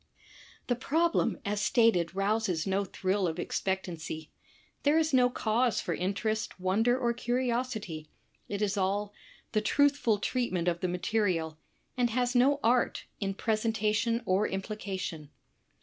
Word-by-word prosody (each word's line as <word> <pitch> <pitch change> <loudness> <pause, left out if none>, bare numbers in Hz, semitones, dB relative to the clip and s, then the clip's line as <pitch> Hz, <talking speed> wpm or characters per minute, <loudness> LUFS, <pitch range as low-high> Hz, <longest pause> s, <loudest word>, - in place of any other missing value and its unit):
The 245 - +1
problem, 325 +7 +1
as 205 +1 -1
stated, 210 -7 +3
rouses 195 -4 0
no 195 +1 0
thrill 190 +1 0
of 160 0 -3
expectancy. 175 -4 -3 0.5
There 295 +2 +3
is 315 -2 +1
no 250 -1 +5
cause 235 -1 +1
for 175 - -2
interest, 200 +5 -2
wonder, 220 +7 +2
or 240 -2 +1
curiosity. 240 -9 -2 0.4
It 205 +1 -2
is 205 0 0
all 200 +2 0 0.4
"The 215 - +1
truthful 280 -2 +3
treatment 200 -6 -1
of 170 -1 +1
the 185 - -1
material," 180 -4 -1 0.4
and 245 -1 +2
has 245 +1 0
no 270 +3 +4
art 240 +1 +2 0.2
in 195 -1 -2
presentation 220 +1 0
or 190 +2 +2
implication. 190 -6 -4
210 Hz, 135 wpm, -30 LUFS, 185-240 Hz, 0.5 s, no